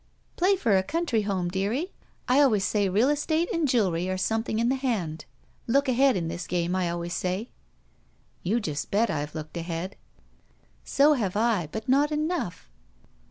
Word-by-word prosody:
"Play 375 Hz, +3 st, +3 dB
for 230 Hz, -, +2 dB
a 190 Hz, -, +4 dB
country 290 Hz, -, 0 dB
home, 190 Hz, -4 st, -1 dB
dearie. 215 Hz, -, -1 dB, 0.4 s
I 255 Hz, +2 st, +4 dB
always 220 Hz, -9 st, +3 dB
say 205 Hz, -2 st, +1 dB
real 215 Hz, +8 st, +3 dB
estate 315 Hz, +6 st, 0 dB
and 330 Hz, -4 st, +1 dB
jewelry 185 Hz, -8 st, +1 dB
are 185 Hz, -, -1 dB
something 220 Hz, +3 st, -1 dB
in 230 Hz, +1 st, +2 dB
the -, -, +3 dB
hand. 200 Hz, -, -2 dB, 0.4 s
Look 275 Hz, +4 st, +2 dB
ahead 260 Hz, -2 st, +3 dB
in 170 Hz, -2 st, -2 dB
this 170 Hz, +1 st, -5 dB
game, 175 Hz, 0 st, 0 dB
I 185 Hz, -2 st, 0 dB
always 170 Hz, 0 st, -3 dB
say." 185 Hz, +6 st, -2 dB, 0.9 s
"You 215 Hz, +7 st, +1 dB
just 150 Hz, -9 st, -4 dB
bet 220 Hz, +3 st, +2 dB
I've 150 Hz, +2 st, -3 dB
looked 155 Hz, +1 st, -6 dB
ahead." 170 Hz, +3 st, -4 dB, 0.9 s
"So 290 Hz, +2 st, +4 dB
have 205 Hz, -9 st, -1 dB
I, 215 Hz, -7 st, +1 dB
but 220 Hz, 0 st, -5 dB
not 285 Hz, +3 st, +3 dB
enough." 305 Hz, -, -2 dB
215 Hz, 170 wpm, -26 LUFS, 180-270 Hz, 0.9 s, a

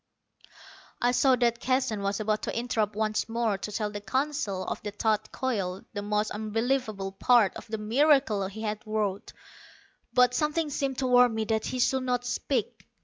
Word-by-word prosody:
I 245 Hz, -, +2 dB
saw 260 Hz, +1 st, +4 dB
that 235 Hz, -1 st, +1 dB
Keston 255 Hz, -5 st, 0 dB
was 200 Hz, +1 st, -1 dB
about 215 Hz, 0 st, 0 dB
to -, -, -3 dB
interrupt 225 Hz, -3 st, -1 dB
once 215 Hz, +1 st, -1 dB
more, 230 Hz, -2 st, 0 dB
to 210 Hz, -, -5 dB
tell 210 Hz, 0 st, -2 dB
the 205 Hz, 0 st, -6 dB
Council 260 Hz, -3 st, -1 dB
of -, -, -4 dB
the 210 Hz, -, -4 dB
thought 215 Hz, +1 st, -1 dB
coil, 195 Hz, -8 st, -2 dB
the 205 Hz, -, -3 dB
most 210 Hz, +1 st, -1 dB
unbelievable 220 Hz, -2 st, -1 dB
part 215 Hz, +1 st, +3 dB
of -, -, -9 dB
the 220 Hz, 0 st, -3 dB
miracle 225 Hz, -2 st, +3 dB
he 215 Hz, +3 st, -8 dB
had 210 Hz, -1 st, -3 dB
wrought. 210 Hz, -2 st, -2 dB, 0.8 s
But 250 Hz, -1 st, +4 dB
something 300 Hz, +3 st, 0 dB
seemed 270 Hz, -2 st, -2 dB
to 265 Hz, -, -1 dB
warn 245 Hz, -2 st, +5 dB
me 220 Hz, 0 st, -1 dB
that 220 Hz, 0 st, -1 dB
he 255 Hz, -, -3 dB
should 265 Hz, +2 st, +2 dB
not 250 Hz, -1 st, -1 dB
speak. -, -, -2 dB
220 Hz, 180 wpm, -28 LUFS, 210-250 Hz, 0.8 s, warn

